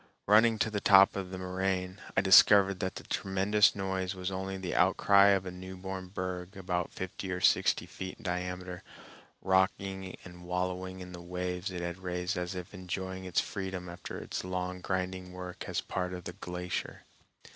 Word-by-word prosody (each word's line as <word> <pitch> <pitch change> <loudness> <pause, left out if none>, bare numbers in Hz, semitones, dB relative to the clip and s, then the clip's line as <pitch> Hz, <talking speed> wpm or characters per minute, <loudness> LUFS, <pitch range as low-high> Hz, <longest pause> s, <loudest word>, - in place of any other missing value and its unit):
Running 110 +2 +5
to 110 +1 0
the 105 -1 -2
top 95 0 +7
of 95 -2 -4
the 95 - -6
moraine, 95 0 -2 0.2
I - - +6
discovered 95 0 +7
that 95 -3 -2
the - - -7
tremendous 100 +2 +2
noise 95 -1 -2
was 90 +1 -3
only 95 0 -3
the 95 -2 -4
outcry 100 +2 +5
of 95 -2 +3
a 90 - -4
newborn 95 +1 -7
berg 90 0 -5
about 90 -2 -2
fifty 95 +1 -5
or 90 - -2
sixty - - +3
feet 95 0 -7
in 115 - -16
diameter, 90 -1 -3 0.6
rocking 95 0 +1
and 90 -1 -11
wallowing 90 +1 -2
in 90 0 -8
the 90 -1 -8
waves 90 +1 -3
it 90 -2 -5
had 85 +1 -4
raised 90 -1 -2
as 90 0 -3
if 90 +1 -7
enjoying 95 0 -5
its 90 - +2
freedom 95 -2 -5
after 85 0 -7
its - - -4
long 90 0 -3
grinding 95 -1 -3
work 90 -1 -7
as - - -1
part 90 -1 -3
of 90 - -8
the - - -6
glacier. 90 0 -5
95 Hz, 180 wpm, -31 LUFS, 90-95 Hz, 0.6 s, top